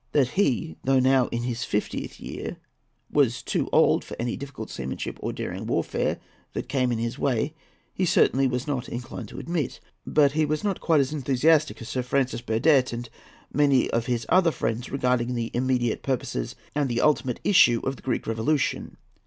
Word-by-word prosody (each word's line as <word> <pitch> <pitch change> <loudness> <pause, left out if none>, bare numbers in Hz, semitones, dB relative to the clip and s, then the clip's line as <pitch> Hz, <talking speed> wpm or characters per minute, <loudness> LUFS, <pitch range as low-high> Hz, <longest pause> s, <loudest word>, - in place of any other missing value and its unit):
That 135 -4 +3
he, 125 - 0
though 135 0 +3
now 130 -1 +4
in 120 0 -3
his 120 -1 -2
fiftieth 105 - -3
year, - - -6 0.5
was - - +2
too - - -1
old - - +4
for - - -9
any 120 0 -1
difficult 135 -5 -7
seamanship 65 +1 -5
or - - -2
daring - - -5
warfare - - 0 0.4
that - - -4
came 130 -1 +1
in 120 - 0
his 115 +1 -3
way 140 +3 0 0.4
he 190 - -1
certainly 135 -6 +3
was 125 0 -2
not 135 -5 -3
inclined 120 -1 -6
to - - -11
admit; 165 -5 -3 0.3
but 145 -2 +4
he 155 +2 +1
was 155 +3 -1
not 200 -3 -1
quite 160 -4 +4
as 135 +2 -2
enthusiastic 150 +3 +2
as 110 - -8
Sir 130 - -1
Francis 125 -1 0
Burdett 130 +4 +3
and 120 0 -6 0.4
many 140 -3 +3
of 115 0 0
his 120 -2 -1
other 180 -1 +4
friends 115 -5 -2
regarding 125 -2 0
the 115 -1 -2
immediate 125 -2 0
purposes 125 - -2 0.2
and 145 -2 0
the 120 0 0
ultimate 130 -5 +2
issue 125 - +5
of 135 - -1
the - - -15
Greek 125 - -2
Revolution. 115 +6 -1
130 Hz, 185 wpm, -25 LUFS, 120-145 Hz, 0.5 s, issue